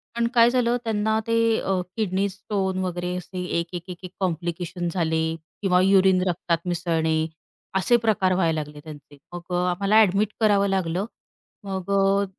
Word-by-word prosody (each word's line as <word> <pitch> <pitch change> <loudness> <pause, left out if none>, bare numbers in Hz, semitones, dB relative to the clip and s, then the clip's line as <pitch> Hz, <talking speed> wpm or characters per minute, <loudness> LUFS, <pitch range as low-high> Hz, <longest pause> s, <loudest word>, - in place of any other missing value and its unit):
पण 235 0 +1
काय 235 0 +7
झालं? 245 -1 +1
त्यांना 220 -1 0
ते 230 - +1 0.2
अ, 190 -1 -1 0.2
किडनी 200 -2 0
स्टोन 190 -1 -3
वगैरे 180 0 -3
असे 180 0 -6 0.2
एक, 170 - -3
एक, 175 -1 -5
एक, 180 - -6
एक 180 - -8
कॉम्प्लिकेशन 175 -1 -3
झाले 160 -2 0 0.4
किंवा 185 -2 +3
युरिन 190 -1 +4
रक्तात 170 -1 0
मिसळणे 165 -2 0 0.6
असे 235 +6 +3
प्रकार 190 -4 +2
व्हायला 165 -4 +1
लागले 150 0 -12
त्यांचे. 145 -2 -12 0.2
मग 175 - -5
अ, 175 - +1
आम्हाला 200 +4 0
ॲडमिट 205 +1 +2
करावं 205 -3 +3
लागलं. 185 0 -1 0.6
मग 190 -1 -4
अ, 195 0 +3
185 Hz, 160 wpm, -24 LUFS, 175-200 Hz, 0.6 s, काय